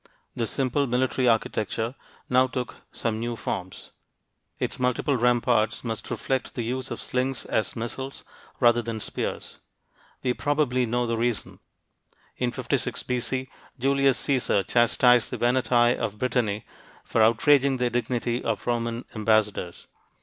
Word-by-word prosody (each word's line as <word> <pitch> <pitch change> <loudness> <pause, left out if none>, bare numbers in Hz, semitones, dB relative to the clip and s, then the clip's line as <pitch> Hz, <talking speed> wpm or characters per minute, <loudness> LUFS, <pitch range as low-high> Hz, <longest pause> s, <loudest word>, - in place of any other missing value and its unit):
This 115 -2 -2
simple 135 +1 0
military 125 +1 +1
architecture 115 0 0 0.3
now 130 +1 +4
took 125 -1 -4
some 110 -2 -2
new 120 +1 -2
forms. 95 -4 -5 0.7
Its - - -2
multiple 125 +3 +1
ramparts 120 -2 +2
must 115 -2 -4
reflect 130 -2 -2
the 120 - -2
use 130 +3 -3
of - - -5
slings 130 0 -1
as 110 - -1
missiles, 130 +4 -5 0.4
rather 120 -1 +5
than 115 -1 -4
spears. - - -4 0.6
We 125 -1 +2
probably 135 -3 +1
know 120 +2 0
the 115 -1 -1
reason. 115 -5 -2 0.8
In 125 -1 0
56 - - -1
B.C., 125 +1 -2 0.3
Julius 135 0 +3
Caesar 125 -7 +1
chastised 120 +2 +4
the - - -4
Veneti 120 -1 +3
of 105 - -3
Brittany 115 -4 0 0.4
for 115 - +1
outraging 135 +4 +4
the 125 -1 0
dignity 120 0 -1
of 115 -3 -2
Roman 115 0 -1
ambassadors. 105 -5 0
120 Hz, 135 wpm, -26 LUFS, 115-130 Hz, 0.8 s, rather